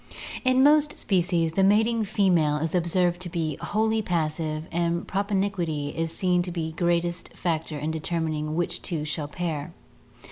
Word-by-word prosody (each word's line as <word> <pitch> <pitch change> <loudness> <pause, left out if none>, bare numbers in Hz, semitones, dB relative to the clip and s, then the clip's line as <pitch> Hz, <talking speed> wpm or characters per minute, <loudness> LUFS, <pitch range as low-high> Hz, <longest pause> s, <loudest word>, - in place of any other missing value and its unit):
In 255 0 +4
most 300 +1 +4
species 175 -3 +1
the 190 +4 +2
mating 220 +3 +3
female 180 -8 +2
is 155 +1 -2
observed 175 0 +1
to 180 - -4
be 160 -4 -2
wholly 220 +1 +1
passive 155 -4 -1
and 170 0 -1
propinquity 190 -7 -1
is 165 +1 -3
seen 180 +1 +1
to 175 0 -4
be 165 -2 -3
the 160 - -16
greatest 175 0 -1
factor 160 -3 -2
in 150 +2 -2
deter 160 +2 -2
mining 155 -1 -2
which 175 0 -1
two 160 -4 -3
shall 150 -1 -2
pair. 160 -1 -4
170 Hz, 165 wpm, -26 LUFS, 160-190 Hz, -, In